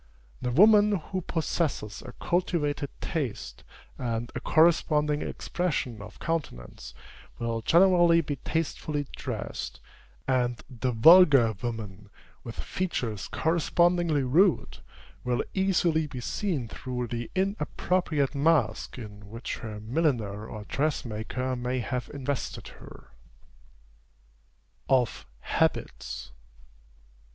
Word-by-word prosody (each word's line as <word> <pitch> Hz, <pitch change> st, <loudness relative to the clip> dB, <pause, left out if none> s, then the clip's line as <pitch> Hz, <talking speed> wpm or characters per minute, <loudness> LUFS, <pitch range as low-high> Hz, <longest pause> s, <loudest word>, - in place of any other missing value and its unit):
The 125 Hz, -, -1 dB
woman 210 Hz, -, +6 dB
who 185 Hz, +1 st, -3 dB
possesses 155 Hz, -, -2 dB
a 125 Hz, -, -9 dB
cultivated 155 Hz, -5 st, 0 dB
taste, 120 Hz, -, -4 dB, 0.4 s
and 120 Hz, -1 st, -2 dB
a -, -, -3 dB
corresponding 150 Hz, -1 st, +3 dB
expression 135 Hz, -, -2 dB
of 105 Hz, +1 st, -11 dB
countenance, 155 Hz, -, -4 dB, 0.4 s
will 115 Hz, -1 st, -2 dB
generally 175 Hz, -, +5 dB
be 145 Hz, -2 st, -4 dB
tastefully 150 Hz, 0 st, -2 dB
dressed; -, -, -5 dB, 0.5 s
and 125 Hz, -2 st, +1 dB
the 125 Hz, 0 st, -2 dB
vulgar 135 Hz, -2 st, +7 dB
woman, 105 Hz, -4 st, -5 dB, 0.3 s
with 115 Hz, -2 st, -7 dB
features 125 Hz, -, -3 dB
correspondingly 170 Hz, -1 st, +2 dB
rude, 165 Hz, +8 st, +2 dB, 0.4 s
will 125 Hz, -1 st, 0 dB
easily 175 Hz, -5 st, +2 dB
be 135 Hz, -3 st, -7 dB
seen 145 Hz, -, -2 dB
through 125 Hz, +1 st, -4 dB
the 120 Hz, -1 st, -4 dB
inappropriate 185 Hz, -6 st, 0 dB
mask 150 Hz, 0 st, +1 dB
in 105 Hz, -4 st, -10 dB
which 115 Hz, +3 st, -5 dB
her 110 Hz, -3 st, -7 dB
milliner 110 Hz, -4 st, -1 dB
or 110 Hz, -, -7 dB
dressmaker 130 Hz, -2 st, -2 dB
may 125 Hz, +1 st, -2 dB
have 125 Hz, 0 st, -3 dB
invested 140 Hz, -1 st, -4 dB
her. -, -, -14 dB, 1.8 s
OF 125 Hz, -3 st, +1 dB
HABITS. -, -, -1 dB
135 Hz, 100 wpm, -28 LUFS, 115-165 Hz, 1.8 s, vulgar